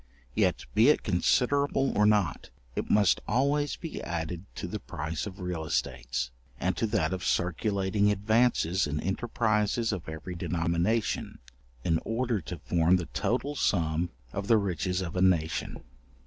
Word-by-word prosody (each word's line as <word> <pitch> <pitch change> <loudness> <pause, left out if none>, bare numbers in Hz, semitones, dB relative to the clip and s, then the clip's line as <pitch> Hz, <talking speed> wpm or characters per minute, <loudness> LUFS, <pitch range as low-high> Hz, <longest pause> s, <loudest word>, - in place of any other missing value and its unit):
Yet - - +1
be 115 +6 +6
it 150 - +3
considerable 135 +8 +2
or 105 +1 +4
not, 105 -8 +1 0.3
it - - -3
must 105 -3 +4
always 145 +3 +1
be 165 - -6
added 85 +1 -4
to - - -4
the - - -4
price 80 +6 -4
of 95 -1 -9
real 90 -3 -3
estates, - - -2 0.3
and 95 +1 0
to 115 - +1
that 105 -3 0
of 90 -2 -4
circulating 100 +4 +1
advances 105 -4 +2
in 75 +1 -2
enterprises 110 +3 0
of 95 -6 -4
every 80 +3 -6
denomination, 85 +6 -1 0.5
in 80 -2 +2
order 115 -2 -1
to 85 +2 -6
form 85 +3 +2
the 90 -2 -1
total 130 +4 0
sum 85 - +1 0.2
of 100 0 -3
the 115 - +6
riches 90 -2 -1
of 85 -2 -5
a 90 - 0
nation. 85 -4 +1
95 Hz, 150 wpm, -29 LUFS, 85-110 Hz, 0.5 s, be